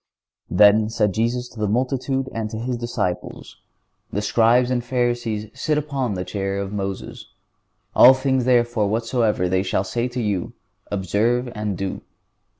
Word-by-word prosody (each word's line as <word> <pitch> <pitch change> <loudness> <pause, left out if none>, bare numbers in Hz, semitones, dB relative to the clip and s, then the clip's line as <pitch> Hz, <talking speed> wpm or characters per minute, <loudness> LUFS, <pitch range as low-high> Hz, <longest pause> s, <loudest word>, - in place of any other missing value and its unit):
"Then 105 +1 +5
said 105 -3 0
Jesus 120 +3 -1
to 115 - -13
the 105 - 0
multitudes 130 +4 -1
and 110 -1 -3
to 110 - -6
His 120 +2 -2
disciples: 120 -7 -4 0.5
The 105 - -2
Scribes 120 +3 +3
and 120 -1 0
Pharisees 120 -3 -1
sit 150 +3 -1
upon 140 -7 -2
the 90 0 -4
chair 95 +1 -3
of 100 0 -4
Moses. 100 -1 -5 0.7
All 130 +2 +9
things 130 -1 0
therefore 120 -4 +2
whatsoever 115 -3 0
they 95 +1 +1
shall 95 0 0
say 120 +5 -2
to 125 0 -5
you, 100 -6 -2 0.4
observe 110 +6 0
and 105 -3 -3
do." 95 0 -4
115 Hz, 155 wpm, -22 LUFS, 100-125 Hz, 0.7 s, All